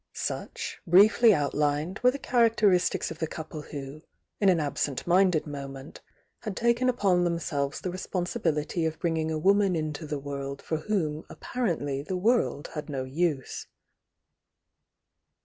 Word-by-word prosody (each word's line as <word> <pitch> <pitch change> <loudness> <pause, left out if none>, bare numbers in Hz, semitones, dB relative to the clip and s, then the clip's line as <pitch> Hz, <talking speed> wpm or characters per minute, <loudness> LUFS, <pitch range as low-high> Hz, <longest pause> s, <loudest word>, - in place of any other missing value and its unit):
Such, - - -4
briefly 215 +6 +7
outlined, 150 +2 0
were 250 - +5
the 265 - -2
characteristics 220 -9 +2
of 160 - -8
the 160 - -1
couple 155 -1 -7
who, 145 0 -8 0.4
in 200 - +4
an 180 -3 +4
absent 145 -2 -2
minded 180 -2 +3
moment, 140 -1 -8 0.4
had 210 -4 -5
taken 235 +2 +2
upon 195 -7 +2
themselves 155 -5 -1
the 185 - -3
responsibility 175 -3 -2
of 160 0 -4
bring 165 -2 -1
ing 160 0 -1
a 160 - -1
woman 195 +2 +3
into 155 0 -3
the 150 0 -2
world 140 0 -5
for 160 - -2
whom 160 -5 -1
apparently 160 - -2
the 185 +6 -3
world 215 - +1
had 150 -1 -5
no 135 -2 -2
use. 145 0 -2
165 Hz, 145 wpm, -28 LUFS, 145-195 Hz, 0.4 s, briefly